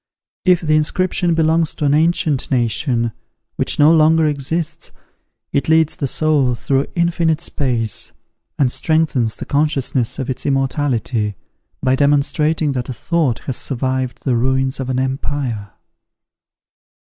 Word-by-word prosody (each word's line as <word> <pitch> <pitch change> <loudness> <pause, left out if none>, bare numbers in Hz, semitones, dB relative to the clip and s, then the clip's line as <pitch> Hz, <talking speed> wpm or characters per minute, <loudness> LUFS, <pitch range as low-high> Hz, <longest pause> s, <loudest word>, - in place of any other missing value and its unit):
If 180 -2 +4
the 155 -2 +2
inscription 175 +2 +1
belongs 160 0 +2
to 150 - -2
an 140 - +3
ancient 155 -3 +1
nation, 120 -1 0 0.4
which - - 0
no 150 +2 +6
longer 160 0 +4
exists, 155 +3 -3 0.6
it 140 0 0
leads 160 -1 +3
the 140 - -2
soul 140 -4 +1
through 135 +3 0
infinite 170 -2 +1
space, 125 - -2 0.5
and 135 -5 +2
strengthens 155 -9 0
the - - -7
consciousness 135 -4 0
of 130 - -3
its 130 - -4
immortality, 130 -6 -1 0.5
by 130 0 +3
demonstrating 145 +2 +1
that 125 -2 -3
a - - -3
thought 155 -7 -1
has 130 - -3
survived 130 -1 -2
the 130 -3 +1
ruins 130 +3 0
of 130 -1 -3
an 130 - -1
empire. 130 -5 -2
140 Hz, 135 wpm, -18 LUFS, 130-155 Hz, 0.6 s, no